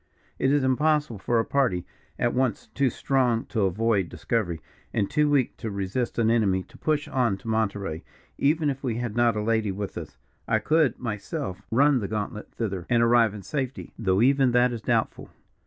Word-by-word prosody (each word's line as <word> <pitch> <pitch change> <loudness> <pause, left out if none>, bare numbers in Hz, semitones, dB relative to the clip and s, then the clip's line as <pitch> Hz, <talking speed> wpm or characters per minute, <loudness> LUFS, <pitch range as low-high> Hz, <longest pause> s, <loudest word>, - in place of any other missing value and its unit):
"It 135 - +2
is 145 -1 +3
impossible 145 -3 +1
for 115 +4 +1
a 115 - +1
party, 120 -11 +1 0.3
at 120 - +1
once 130 -2 0
too 135 -1 +2
strong 125 -2 +1
to 110 -4 +1
avoid 100 -1 +1
discovery, 85 0 -2 0.3
and 100 - 0
too 150 0 +2
weak 140 -4 +2
to 110 - -4
resist 100 +5 -3
an 115 -1 +3
enemy, 100 -5 +2
to - - -16
push 150 -2 0
on 120 -7 +1
to 115 - -13
Monterey, 100 -7 -1 0.3
even 150 +1 +2
if 135 +1 -8
we 120 -4 -1
had 120 -2 -3
not 120 -1 +3
a 105 - -1
lady 110 -2 +1
with 100 +1 -5
us. - - -10 0.3
I - - +3
could, 155 -3 +2
myself, 105 - -4
run 140 +3 +4
the 100 - -3
gauntlet 105 0 -4
thither, 95 -6 -3
and 120 -1 +4
arrive 115 -2 +4
in 100 - -8
safety, 135 0 -4
though 95 -1 +2
even 135 -1 +4
that 125 0 +4
is 115 - -5
doubtful. - - -1
115 Hz, 190 wpm, -26 LUFS, 105-130 Hz, 0.3 s, run